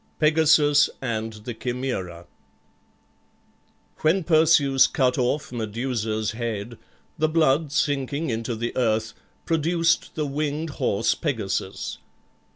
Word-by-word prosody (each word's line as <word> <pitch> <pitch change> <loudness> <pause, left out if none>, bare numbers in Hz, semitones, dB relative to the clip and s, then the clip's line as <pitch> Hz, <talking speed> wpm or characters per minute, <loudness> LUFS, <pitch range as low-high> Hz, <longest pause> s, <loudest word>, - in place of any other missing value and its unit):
PEGASUS 150 -1 +4
AND 115 -4 -3
THE 120 - -4
CHIMAERA 110 -9 -4 1.7
When 165 +4 +2
Perseus 155 -5 +4
cut 130 -1 +1
off 130 +4 -1
Medusa's 110 -1 -2
head, 115 -1 -5 0.4
the 155 0 +2
blood 155 -2 +2
sinking 145 +1 -1
into 115 +1 -3
the 120 +2 -4
earth 110 -2 0 0.3
produced 165 +1 +1
the 155 - -1
winged 150 +2 -2
horse 100 +3 +2
Pegasus. 110 - -3
130 Hz, 100 wpm, -24 LUFS, 115-155 Hz, 1.7 s, PEGASUS